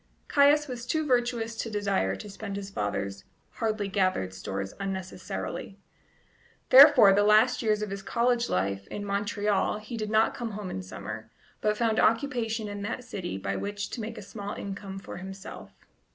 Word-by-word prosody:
Caius 295 +1 +5
was 245 -2 -6
too 315 +4 0
virtuous 240 -3 0
to 225 - -3
desire 200 - 0
to 210 - -9
spend 200 0 -6
his 200 0 -6
father's 100 - -3 0.3
hardly 215 -2 -1
gathered 185 - 0
stores 95 +1 -5
unnecessarily; 190 -1 -5 0.9
therefore, 260 -7 +9
the 200 - +4
last 215 +4 +5
years 215 -2 +1
of 210 - -4
his 200 0 -4
college 240 +3 +1
life 100 +1 -1
in 205 - -5
Montreal 205 0 0
he 220 +3 -7
did 215 -1 -3
not 220 +1 +3
come 230 -3 -5
home 200 -2 -5
in 95 - -4
summer, 105 +4 -7 0.3
but 210 0 +1
found 225 -2 +1
occupation 230 -3 +1
in 205 0 -5
that 205 +5 -4
city 175 - -5
by 100 0 -3
which 205 - -4
to 240 - -4
make 225 +1 -6
a - - -7
small 205 0 -6
income 195 -1 -6
for 195 - -8
himself. 190 +1 -9
205 Hz, 170 wpm, -28 LUFS, 190-230 Hz, 0.9 s, therefore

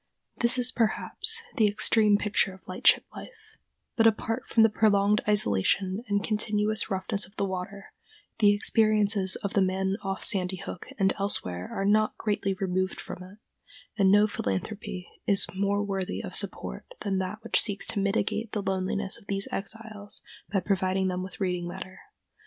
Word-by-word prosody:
This 235 +2 +3
is, 250 0 +4
perhaps, 420 - +2
the 220 - +4
extreme 210 0 +3
picture 205 -2 0
of 190 - -22
lightship 185 - +3
life, 440 -2 -13 0.4
but 225 -1 +4
apart 225 +3 -1
from 225 - +4
the 225 - +5
prolonged 210 -1 +2
isolation 190 - +2
and 205 -1 0
continuous 215 0 0
roughness 195 +1 0
of 200 - -23
the 200 - -1
water, 190 +1 -6 0.5
the 205 -2 +5
experiences 205 -2 +3
of 200 - -3
the 200 - +2
men 190 +1 0
off 195 -1 -4
Sandy 190 -2 +2
Hook 180 0 -8
and 195 -2 +2
elsewhere 90 - -2
are 195 - -3
not 215 +1 +2
greatly 205 -2 -1
removed 185 -1 -2
from - - -8
it, 185 +3 -12 0.6
and 195 -3 +3
no 205 +1 +5
philanthropy 195 - -4 0.2
is 200 -1 +5
more 200 +1 0
worthy 190 - -3
of - - -7
support 60 - +1 0.2
than 195 -2 -1
that 190 +3 -4
which 230 - +3
seeks 205 -2 +1
to 210 - 0
mitigate 210 +2 -1
the 205 - -2
loneliness 190 +1 -2
of 200 - -23
these 195 0 -3
exiles 215 0 -2 0.3
by 195 -2 +1
providing 190 0 0
them 180 0 -3
with 185 +3 -9
reading 180 -3 -2
matter. 185 +2 -9
200 Hz, 165 wpm, -27 LUFS, 190-215 Hz, 0.6 s, the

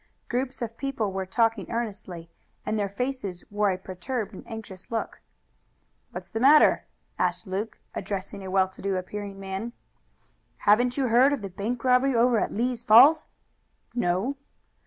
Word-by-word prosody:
Groups 255 +1 -2
of 230 0 -6
people 255 -7 -2
were 190 0 -3
talking 225 0 +1
earnestly, 195 -7 -5 0.3
and 215 0 -1
their 200 -1 -1
faces 205 -4 -4
wore 205 0 +2
a 185 - 0
perturbed 200 +4 -5
and - - -9
anxious 210 -5 -9
look. 225 -1 -4 0.9
"What's - - -8
the 225 - -2
matter?" 290 +5 +6 0.3
asked - - 0
Luke, 195 +3 -4 0.2
addressing 200 0 -5
a 190 - -6
well 190 0 +3
to 190 - -14
do 195 -1 -1
appearing 200 +1 -6
man. 195 +4 -5 0.8
"Haven't 245 +5 +3
you 265 -3 +1
heard 255 +5 +5
of 260 -7 -3
the 195 - -5
bank 220 +6 -3
robbery 255 +1 +3
over 235 0 +4
at - - -1
Lee's 240 +1 -1
Falls?" 260 +8 +7 0.7
"No." 235 +4 0
220 Hz, 155 wpm, -26 LUFS, 195-245 Hz, 0.9 s, Falls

